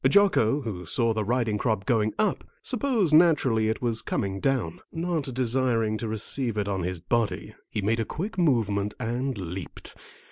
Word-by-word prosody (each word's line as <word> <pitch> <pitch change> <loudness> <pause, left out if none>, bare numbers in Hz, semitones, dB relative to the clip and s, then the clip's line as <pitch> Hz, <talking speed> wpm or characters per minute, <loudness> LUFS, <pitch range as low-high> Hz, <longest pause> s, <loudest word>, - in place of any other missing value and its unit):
Jocko, 150 - +4
who 95 - -5
saw 115 +3 +2
the 110 -1 -1
riding 115 -1 0
crop 110 -4 0
going 110 -3 +2
up, 215 -3 +1 0.2
supposed 235 - +1
naturally 140 -10 +4
it 110 - -2
was 115 -2 0
coming 95 0 -2
down. 125 -9 0
Not 165 -5 -2
desiring 120 -3 +1
to 115 - -3
receive 110 +2 -2
it 105 -1 0
on 95 -2 -1
his 90 0 -3
body, 105 +2 -1 0.2
he 105 - -3
made 110 +3 +1
a - - +2
quick 195 - -4
movement 105 - +1
and 125 +2 -2
leaped. 90 -3 -7
115 Hz, 170 wpm, -26 LUFS, 105-135 Hz, 0.2 s, Jocko